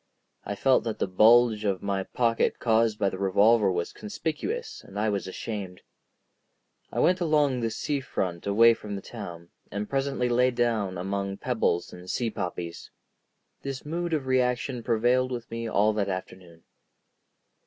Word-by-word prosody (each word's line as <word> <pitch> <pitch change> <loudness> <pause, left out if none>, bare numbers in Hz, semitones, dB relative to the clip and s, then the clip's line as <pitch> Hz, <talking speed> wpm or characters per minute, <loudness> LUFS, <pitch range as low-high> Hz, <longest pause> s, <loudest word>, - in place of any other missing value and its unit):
I 100 - -3
felt 130 +5 +3
that 115 - -2
the - - 0
bulge 110 +3 +5
of 100 -3 -1
my 100 -1 -1
pocket 115 +3 0
caused 110 -2 +2
by 100 - +1
the 95 - -6
revolver 100 +2 +4
was 85 -1 -2
conspicuous, 415 - -4
and - - -11
I 110 +1 +1
was 100 -2 -2
ashamed. 95 -1 -6 1.1
I - - -7
went 185 +1 +3
along 150 -6 +2
the 115 -1 0
sea 140 +6 -2
front 90 -9 -3
away 115 +3 +6
from 105 -2 -7
the 95 - -6
town, 85 -7 -8 0.2
and 100 +1 -4
presently 135 -2 0
lay 125 +1 +3
down 115 -6 0
among 100 +1 -3
pebbles 110 -9 -1
and 90 +1 -11
sea 115 +2 -1
poppies. 90 -4 -5 0.7
This 135 0 -5
mood 170 +2 -2
of 150 -4 0
reaction 125 -1 0
prevailed 120 +2 +2
with 120 -2 -5
me 115 0 -3
all 105 +1 +3
that 100 -2 -1
afternoon. 90 -3 -7
115 Hz, 160 wpm, -27 LUFS, 100-125 Hz, 1.1 s, away